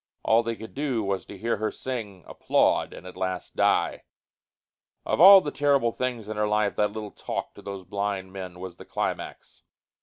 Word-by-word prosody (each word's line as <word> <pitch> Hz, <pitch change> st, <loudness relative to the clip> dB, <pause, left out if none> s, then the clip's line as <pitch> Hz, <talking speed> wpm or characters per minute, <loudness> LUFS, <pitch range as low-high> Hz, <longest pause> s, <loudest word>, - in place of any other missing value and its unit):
All 115 Hz, +1 st, +4 dB
they 115 Hz, 0 st, -3 dB
could 110 Hz, 0 st, -10 dB
do 135 Hz, -6 st, -1 dB
was 100 Hz, -1 st, -2 dB
to 100 Hz, -, -9 dB
hear 115 Hz, +4 st, -1 dB
her 110 Hz, +1 st, -1 dB
sing, 105 Hz, -8 st, -6 dB
applaud -, -, +1 dB
and -, -, -11 dB
at 90 Hz, -, -10 dB
last 95 Hz, -1 st, -4 dB
die. -, -, +2 dB, 1.0 s
Of -, -, 0 dB
all 195 Hz, +1 st, +11 dB
the 145 Hz, -, -4 dB
terrible 140 Hz, -5 st, +2 dB
things 120 Hz, -3 st, -3 dB
in 110 Hz, 0 st, -5 dB
her 105 Hz, 0 st, +1 dB
life 105 Hz, -1 st, +1 dB
that 105 Hz, -1 st, +2 dB
little 105 Hz, -1 st, -6 dB
talk -, -, -5 dB
to -, -, -13 dB
those 100 Hz, -2 st, -7 dB
blind 100 Hz, 0 st, -3 dB
men 90 Hz, -2 st, -7 dB
was 90 Hz, -2 st, -8 dB
the -, -, -12 dB
climax. -, -, -5 dB
105 Hz, 190 wpm, -26 LUFS, 95-115 Hz, 1.0 s, all